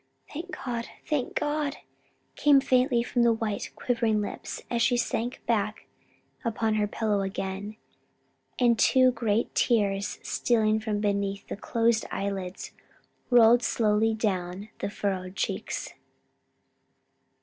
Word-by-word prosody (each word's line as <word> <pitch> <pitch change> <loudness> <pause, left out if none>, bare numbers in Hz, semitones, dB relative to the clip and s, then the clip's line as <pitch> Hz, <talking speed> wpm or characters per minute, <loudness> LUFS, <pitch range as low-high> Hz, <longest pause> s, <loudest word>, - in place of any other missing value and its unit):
"Thank 335 +5 -6 0.2
God! 235 -2 -3 0.2
thank 290 -5 -1
God!" 295 -1 -1 0.6
came 290 -2 +5
faintly 255 -2 +2
from 245 0 0
the 235 0 +5
white 220 -2 -3
quivering 230 -3 +1
lips, 205 - -5
as 235 -1 -1
she 240 +1 +3
sank 240 +1 -2
back 215 -2 -1 0.6
upon 225 -2 0
her 210 -1 +1
pillow 210 -1 0
again, 195 +2 -4 0.8
and 240 -2 +3
two 255 -1 +5
great 225 -2 0
tears 200 -4 +1
stealing 220 -2 +1
from 215 -1 -2
beneath 200 -1 -1
the - - -4
closed 230 +2 +1
eyelids 195 -2 -4 0.6
rolled 240 -1 +6
slowly 220 -1 +2
down 195 -2 -2
the - - -2
furrowed 190 -2 -3
cheeks. - - -3
220 Hz, 120 wpm, -27 LUFS, 205-240 Hz, 0.8 s, rolled